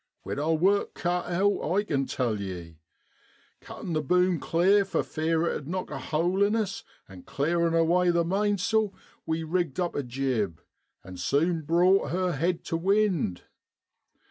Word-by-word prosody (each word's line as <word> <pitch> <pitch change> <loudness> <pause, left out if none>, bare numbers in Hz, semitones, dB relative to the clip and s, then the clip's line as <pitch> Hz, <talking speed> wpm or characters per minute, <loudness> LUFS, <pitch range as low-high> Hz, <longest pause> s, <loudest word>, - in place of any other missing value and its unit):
We'd - - -3
our 160 +2 +1
work 195 +5 +1
cut 175 0 -1
out, 195 +4 +1 0.2
I 205 - +3
kin 135 -9 -1
tell 115 -5 -1
ye. 85 -5 -7 0.8
Cuttin' 170 - -7
the 155 - +1
boom 180 +3 +2
clear 190 +5 +3
for 195 - -1
fear 160 +1 0
it - - 0
'ud 140 - -6
knock 185 +1 -4
a 135 - -4
hole 170 +8 0
in 205 +2 +3
us, 225 0 -2 0.2
an' 95 -2 -12
clearin' 165 - 0
away 175 +2 +3
the 170 -1 +2
mainsail, 205 +2 +1 0.3
we 160 0 -1
rigged 165 -3 -1
up 175 -1 -1
a - - -1
jib 120 - -2 0.4
an' 95 -1 -10
sune 160 - +1
brought 175 +5 +3
her 185 0 0
head 170 +3 -1
tu 165 - -2
wind. 190 - +1
170 Hz, 165 wpm, -27 LUFS, 145-185 Hz, 0.8 s, I